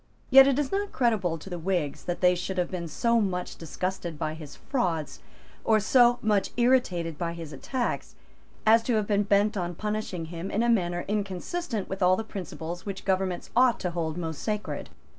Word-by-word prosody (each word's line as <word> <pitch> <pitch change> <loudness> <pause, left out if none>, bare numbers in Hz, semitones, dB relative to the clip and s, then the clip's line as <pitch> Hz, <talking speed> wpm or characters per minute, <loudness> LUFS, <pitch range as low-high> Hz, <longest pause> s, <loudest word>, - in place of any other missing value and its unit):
Yet 270 +1 +10
it 275 -1 +2
is 290 -2 0
not 405 +1 -1
creditable 210 -9 +1
to 155 - -12
the 175 -2 -5
Whigs 165 -5 -2
that 175 - -3
they 180 -1 +6
should 185 +1 -4
have 180 - 0
been 175 -2 -4
so 235 +8 +2
much 180 -3 -2
disgusted 175 0 -4
by 155 +1 -2
his 155 -2 -10
frauds, 175 - -2 0.4
or 220 -1 +4
so 240 +3 +5
much 210 -2 +2
irritated 185 - +2
by 170 -1 -2
his 165 -3 -8
attacks, 245 - -3 0.5
as 225 +1 +6
to 230 +1 0
have 215 -1 +1
been 205 -1 +2
bent 205 +2 +2
on 175 -3 -2
punishing 210 -4 -3
him 170 +3 -5
in 220 - 0
a 240 - +2
manner 175 -6 +1
inconsistent 210 - -3
with 190 +1 -5
all 180 0 +5
the 225 - -3
principles 175 -4 -6
which 195 -2 -6
governments 190 -2 -1
ought 250 0 +4
to 180 - -1
hold 165 -1 -2
most 160 -3 -4
sacred. 210 -1 -3
190 Hz, 195 wpm, -27 LUFS, 175-225 Hz, 0.5 s, Yet